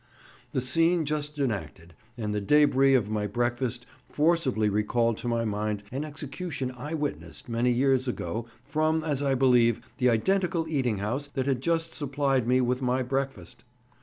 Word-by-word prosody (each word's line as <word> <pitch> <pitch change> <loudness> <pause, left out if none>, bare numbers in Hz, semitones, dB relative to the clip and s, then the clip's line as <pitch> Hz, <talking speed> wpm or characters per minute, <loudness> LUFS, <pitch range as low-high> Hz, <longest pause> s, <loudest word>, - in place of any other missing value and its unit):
The 130 - +1
scene 165 +6 +2
just 150 0 -3
enacted 90 - -3 0.2
and 105 -3 -2
the 105 - -1
débris 135 +2 +5
of 105 -3 -2
my 105 -1 -1
breakfast 120 +2 -2 0.2
forcibly 150 -9 +2
recalled 110 +2 +1
to - - -5
my 115 -1 0
mind 105 -1 -2
an 135 +4 -3
execution 145 -2 -5
I 145 +6 -5
witnessed 150 -2 -5
many 120 +1 +1
years 130 +1 +2
ago 115 -1 -3 0.2
from, 155 +3 0
as 145 -3 -1
I 140 -1 +1
believe, 125 -3 +4 0.2
the 125 -1 +4
identical 175 - +1
eating 130 -8 0
house 120 +9 -2
that 130 -2 0
had 135 -3 0
just 165 +2 0
supplied 135 -4 0
me 130 +1 +3
with 125 +1 0
my 130 0 +1
breakfast. 135 -9 -4
130 Hz, 165 wpm, -27 LUFS, 115-145 Hz, 0.2 s, débris